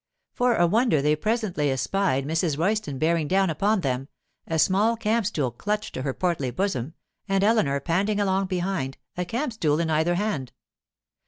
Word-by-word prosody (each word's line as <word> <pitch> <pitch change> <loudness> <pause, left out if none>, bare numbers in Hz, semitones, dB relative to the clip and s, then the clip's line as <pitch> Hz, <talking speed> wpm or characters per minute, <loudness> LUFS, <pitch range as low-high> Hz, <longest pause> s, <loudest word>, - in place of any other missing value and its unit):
For 245 -1 +2
a 175 - +4
wonder 220 - +3
they 150 +2 +2
presently 200 -5 -1
espied 135 +1 0
Mrs. 160 -1 0
Royston 175 -4 0
bearing 160 +1 +1
down 190 +1 +2
upon 200 +5 +1
them, 135 -2 -2 0.4
a 165 - -1
small 205 +8 +3
camp 225 -1 +1
stool 145 - -1
clutched 210 - -3
to - - -4
her 135 0 -1
portly 170 -8 -1
bosom, 155 -1 -2 0.3
and 195 0 +2
Eleanor 200 -11 +2
panting 195 +8 0
along 195 -1 +1
behind, 180 -7 -2 0.2
a 180 - -2
camp 240 - -2
stool 155 -8 +1
in 165 -1 0
either 160 +3 +2
hand. 175 - -2
175 Hz, 170 wpm, -25 LUFS, 150-205 Hz, 0.4 s, a